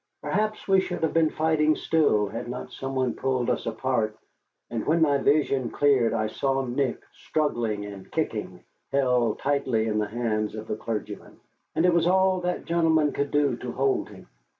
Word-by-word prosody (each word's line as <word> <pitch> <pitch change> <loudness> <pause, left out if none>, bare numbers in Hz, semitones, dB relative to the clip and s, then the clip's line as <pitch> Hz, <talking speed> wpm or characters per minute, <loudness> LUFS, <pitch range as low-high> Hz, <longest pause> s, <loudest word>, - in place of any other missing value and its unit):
Perhaps 215 0 -1
we 195 -1 +5
should 185 - -3
have 160 - +1
been 165 -1 +3
fighting 155 -1 +2
still 145 -13 +2
had 115 +4 -6
not 125 +1 -6
some 135 0 -5
one 130 -2 +1
pulled 130 -2 0
us - - -2
apart, 115 -2 -1 0.5
and 115 -2 -2
when 160 +3 +3
my 145 -3 +3
vision 135 -4 +2
cleared 135 -5 +3
I 110 - 0
saw 135 +4 -1
Nick, 130 +1 -1
struggling 115 -9 -1
and 100 -2 -10
kicking, - - -3 0.3
held 125 -4 +2
tightly 135 -6 0
in 105 -1 0
the 105 - 0
hands 110 -2 -2
of 110 0 -6
the - - -2
clergyman. 110 0 -6 0.4
And 160 - +2
it 180 - +4
was 170 0 +3
all 190 0 +3
that 180 0 -2
gentleman 160 -3 +2
could 140 0 -2
do 145 -4 +2
to 125 0 -6
hold 135 0 0
him. - - -14
135 Hz, 180 wpm, -26 LUFS, 115-155 Hz, 0.5 s, we